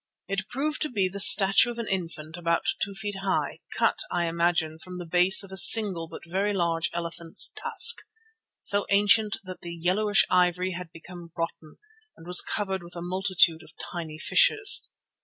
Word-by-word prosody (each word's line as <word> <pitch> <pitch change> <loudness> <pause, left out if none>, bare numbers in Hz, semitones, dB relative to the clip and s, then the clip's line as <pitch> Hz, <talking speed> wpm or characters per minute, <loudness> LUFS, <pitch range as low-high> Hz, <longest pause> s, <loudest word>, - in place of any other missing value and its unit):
It 195 +1 -5
proved 300 +4 -4
to 305 - -2
be 200 -6 -2
the 195 +2 -8
statue 195 +3 +6
of 240 - -8
an 230 -2 -6
infant 165 -4 -6
about 170 -1 -3 0.2
two 200 0 -7
feet 205 0 -7
high, 195 -1 -3 0.2
cut, - - 0
I 175 -1 -2
imagine, 170 -1 -2
from 180 +1 -11
the 175 - -8
base 180 +4 +4
of 195 - -13
a 190 - -6
single 190 -6 +6
but 165 - -13
very 195 +4 -3
large 170 -3 -2
elephant's 170 -1 -1
tusk, 460 0 +3 0.6
so 205 0 +1
ancient 205 +1 +1
that 185 -1 -11
the 170 0 -9
yellowish 195 +5 0
ivory 180 0 0
had 180 -2 -9
become 170 +1 -14
rotten 165 -2 -7 0.4
and 165 - -16
was 180 +1 +6
covered 195 -3 -5
with 175 0 -13
a 170 - -8
multitude 180 -3 0
of - - -18
tiny 165 -4 -8
fissures. 425 - +3
185 Hz, 175 wpm, -24 LUFS, 170-200 Hz, 0.6 s, statue